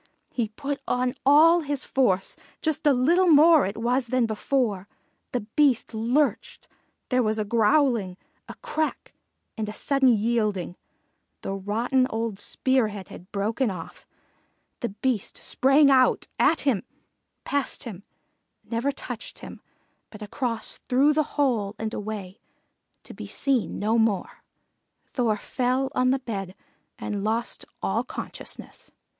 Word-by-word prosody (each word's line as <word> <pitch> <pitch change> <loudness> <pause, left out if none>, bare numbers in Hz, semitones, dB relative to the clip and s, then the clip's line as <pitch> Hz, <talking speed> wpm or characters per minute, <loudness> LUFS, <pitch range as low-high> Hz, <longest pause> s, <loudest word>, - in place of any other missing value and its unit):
He 235 -4 -1
put 280 +5 -5
on 250 0 0
all 320 +4 +7
his 290 -4 -2
force, 195 -8 +1 0.3
just 315 0 0
a - - +7
little 330 +9 +3
more 315 - +6
it 200 - -6
was 240 +2 0
than 255 0 +2
before; 220 -3 -1 0.4
the 250 - -1
Beast 275 -6 +3
lurched, 240 +7 0 0.4
there 255 -1 +3
was 215 -1 0
a 215 - -1
growling, 230 -3 +2 0.3
a - - -7
crack, 315 -11 -3 0.4
and 215 -2 -3
a - - -6
sudden 275 +3 +1
yielding; 215 -5 0 0.7
the 195 - -3
rotten 230 +7 0
old 225 -2 -3
spear 260 +1 +1
head 200 -3 -8
had 180 - -12
broken 220 +5 0
off, 180 -4 -8 0.7
the 240 - -2
Beast 215 +1 -2
sprang 275 +2 +4
out 255 -1 +4
at 330 - +3
him 265 -9 +1 0.6
past 285 -2 -1
him 205 -6 -8 0.6
never 235 +4 -1
touched 245 -4 -7
him, - - -10 0.5
but 210 -1 -10
across 230 +2 -3
through 275 +4 +4
the 305 0 -1
hole 225 -8 +1
and 220 0 -4
away, 205 -2 -6 0.6
to - - -10
be - - -8
seen 265 -5 0
no 220 +3 +1
more. 220 -4 0 0.6
Thor 230 -5 0
fell 255 +4 -1
on 255 0 +2
the 265 - +3
bed 200 -7 -5 0.4
and 205 -2 -4
lost 225 +3 -2 0.2
all - - 0
consciousness. - - -7
240 Hz, 140 wpm, -25 LUFS, 210-275 Hz, 0.7 s, all